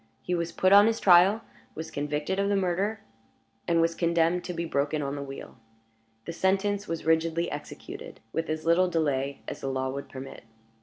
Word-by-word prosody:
He 180 Hz, -, -2 dB
was 170 Hz, -1 st, -1 dB
put 185 Hz, +3 st, +3 dB
on 205 Hz, +1 st, +8 dB
his 225 Hz, 0 st, 0 dB
trial, 190 Hz, +4 st, +6 dB, 0.3 s
was 160 Hz, +1 st, -6 dB
convicted 150 Hz, +6 st, -2 dB
of 200 Hz, 0 st, +1 dB
the 205 Hz, -, +2 dB
murder, 195 Hz, +3 st, 0 dB, 0.7 s
and 170 Hz, -1 st, +3 dB
was 165 Hz, 0 st, +2 dB
condemned 170 Hz, +1 st, +1 dB
to 180 Hz, -, -4 dB
be 170 Hz, -, -2 dB
broken 145 Hz, -1 st, -1 dB
on 140 Hz, +1 st, -3 dB
the 140 Hz, -, -5 dB
wheel. 135 Hz, -2 st, -9 dB, 0.7 s
The 170 Hz, -, -5 dB
sentence 195 Hz, +3 st, 0 dB
was 165 Hz, -2 st, -4 dB
rigidly 165 Hz, +1 st, +1 dB
executed, 145 Hz, -, -8 dB
with 165 Hz, 0 st, -2 dB
as 155 Hz, 0 st, -3 dB
little 170 Hz, +3 st, +4 dB
delay 140 Hz, -5 st, -1 dB
as -, -, -6 dB
the -, -, -3 dB
law 130 Hz, 0 st, -1 dB
would 140 Hz, +1 st, -6 dB
permit. 135 Hz, 0 st, -9 dB
165 Hz, 190 wpm, -27 LUFS, 150-185 Hz, 0.7 s, on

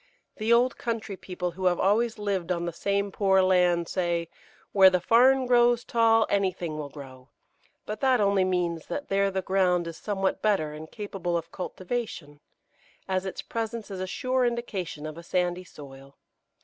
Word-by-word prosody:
The 220 Hz, +1 st, -1 dB
old 245 Hz, +2 st, +3 dB
country 225 Hz, -4 st, -3 dB
people 180 Hz, -1 st, -5 dB
who 185 Hz, +2 st, -6 dB
have 180 Hz, -1 st, +3 dB
always 220 Hz, +4 st, +2 dB
lived 195 Hz, -4 st, -2 dB
on 170 Hz, -1 st, -1 dB
the 170 Hz, -, -3 dB
same 200 Hz, +3 st, -1 dB
poor 190 Hz, -1 st, +3 dB
land 180 Hz, -2 st, +3 dB
say, 170 Hz, -2 st, -1 dB, 0.4 s
"Where 190 Hz, -2 st, +7 dB
the 185 Hz, -1 st, +1 dB
farn 255 Hz, +7 st, +4 dB
grows 240 Hz, -1 st, +4 dB
tall 225 Hz, -1 st, +3 dB
anything 185 Hz, -5 st, -1 dB
will 150 Hz, -2 st, -5 dB
grow"; 135 Hz, -2 st, -12 dB, 0.6 s
but 215 Hz, 0 st, -5 dB
that 260 Hz, -2 st, +3 dB
only 200 Hz, -2 st, +3 dB
means 175 Hz, -3 st, -1 dB
that 290 Hz, -, -5 dB
there 195 Hz, 0 st, +2 dB
the 190 Hz, -1 st, -3 dB
ground 180 Hz, -2 st, +2 dB
is 165 Hz, -1 st, -7 dB
somewhat 195 Hz, -2 st, -2 dB
better 190 Hz, -8 st, +1 dB
and 155 Hz, +1 st, -9 dB
capable 195 Hz, -5 st, -3 dB
of 165 Hz, 0 st, -6 dB
cultivation, 185 Hz, -6 st, -5 dB, 0.7 s
as 190 Hz, 0 st, -1 dB
its 190 Hz, -, -6 dB
presence 225 Hz, -1 st, -4 dB
is 190 Hz, -, -5 dB
a 185 Hz, -, -3 dB
sure 255 Hz, +5 st, 0 dB
indication 210 Hz, -10 st, -3 dB
of 155 Hz, +1 st, -7 dB
a -, -, -11 dB
sandy 180 Hz, +1 st, -1 dB
soil. 140 Hz, -4 st, -13 dB
190 Hz, 175 wpm, -27 LUFS, 170-220 Hz, 0.7 s, Where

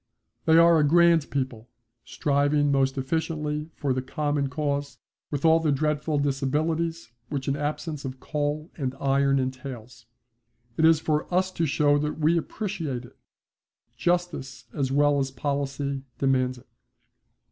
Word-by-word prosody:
They 160 Hz, 0 st, +5 dB
are 170 Hz, -1 st, +6 dB
a -, -, +4 dB
grand 170 Hz, 0 st, +4 dB
people, 125 Hz, -4 st, -3 dB, 0.4 s
striving 145 Hz, 0 st, +1 dB
most 135 Hz, 0 st, +1 dB
efficiently 150 Hz, +2 st, -2 dB
for 140 Hz, -3 st, -1 dB
the 130 Hz, -, -1 dB
common 145 Hz, 0 st, -1 dB
cause, 145 Hz, 0 st, -2 dB, 0.3 s
with 145 Hz, +1 st, -2 dB
all 160 Hz, 0 st, +6 dB
the 160 Hz, -2 st, +1 dB
dreadful 150 Hz, +1 st, 0 dB
disabilities 150 Hz, +3 st, -1 dB, 0.2 s
which 140 Hz, -3 st, -3 dB
an 140 Hz, -, +1 dB
absence 150 Hz, +1 st, -3 dB
of 130 Hz, -1 st, -6 dB
coal 150 Hz, +2 st, -3 dB
and 130 Hz, -4 st, -3 dB
iron 140 Hz, 0 st, +2 dB
entails. 130 Hz, -2 st, -5 dB, 0.7 s
It 160 Hz, -, +3 dB
is 160 Hz, -1 st, +6 dB
for 155 Hz, +1 st, -1 dB
us 185 Hz, +1 st, +1 dB
to 165 Hz, -3 st, -1 dB
show 145 Hz, 0 st, +3 dB
that 150 Hz, +1 st, -2 dB
we 160 Hz, +2 st, +3 dB
appreciate 165 Hz, -, -3 dB
it. -, -, -17 dB, 0.8 s
Justice 170 Hz, -9 st, -2 dB
as 135 Hz, -3 st, -1 dB
well 145 Hz, +1 st, +3 dB
as 135 Hz, -1 st, 0 dB
policy 140 Hz, 0 st, -2 dB, 0.2 s
demands 130 Hz, -2 st, +1 dB
it. 125 Hz, -, -17 dB
145 Hz, 145 wpm, -26 LUFS, 135-155 Hz, 0.8 s, are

